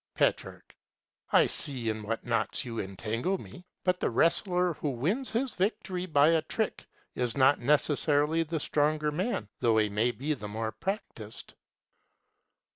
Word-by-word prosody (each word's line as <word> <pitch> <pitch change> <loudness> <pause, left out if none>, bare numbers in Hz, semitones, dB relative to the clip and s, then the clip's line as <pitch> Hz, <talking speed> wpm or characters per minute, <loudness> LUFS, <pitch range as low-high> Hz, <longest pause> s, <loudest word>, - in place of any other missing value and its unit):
Petrarch. - - -1 0.6
I - - +6
see 130 -5 -3
in 110 0 -3
what 110 +2 -4
knots 120 +3 -1
you 115 -2 -4
entangle 110 - -2
me. 180 0 -12 0.2
But 180 -1 +1
the - - +1
wrestler 180 - +2
who 150 - -3
wins 175 - -1
his 250 0 -1
victory 185 -2 -2
by 150 -2 +5
a 165 -1 +3
trick - - -3 0.3
is 125 +1 -1
not 135 +1 +5
necessarily 150 +3 +2
the 165 0 -2
stronger 150 +1 +1
man, 175 - -2
though 115 -3 +3
he 110 -1 +3
may 105 +4 +1
be 140 +5 -2
the 105 -7 -6
more 110 +1 -3
practised. 120 - -6
145 Hz, 150 wpm, -29 LUFS, 115-180 Hz, 0.6 s, I